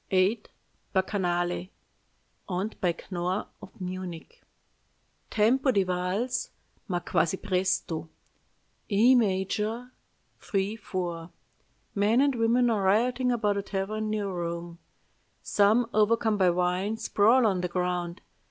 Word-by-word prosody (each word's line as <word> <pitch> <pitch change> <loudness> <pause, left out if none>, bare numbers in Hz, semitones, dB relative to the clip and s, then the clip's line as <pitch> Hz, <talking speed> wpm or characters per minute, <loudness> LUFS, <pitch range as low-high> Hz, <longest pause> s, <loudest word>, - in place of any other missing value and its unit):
"VIII. 195 +4 +2 0.5
BACCHANALE 180 -2 0 0.8
(Owned 190 +4 -3
by 175 -2 +1 0.2
Knorr 180 +2 -1 0.2
of 190 - -13
Munich) 180 -2 -7 0.9
"Tempo 250 +6 +3
di 200 -6 +3
valse, 185 +8 -1 0.4
ma 180 -4 -1
quasi 175 +2 +1
presto, 185 -5 -1 0.8
E 225 +5 +5
major, 215 +2 0 0.5
3 200 +1 -1
4. 175 -6 -4 0.6
Men 210 +4 +3
and 280 0 +4
women 235 +1 +3
are 215 -3 +1
rioting 245 +6 +2
about 210 -4 +1
a - - 0
tavern 205 +2 -3
near 210 -1 -1
Rome. 170 -2 -4 0.6
Some, 215 +4 +3
overcome 220 +1 +3
by 190 -3 +4
wine, 180 +4 0
sprawl 225 +4 +3
on 190 -4 +2
the 180 - -1
ground. 180 0 -2
195 Hz, 115 wpm, -28 LUFS, 180-220 Hz, 0.9 s, E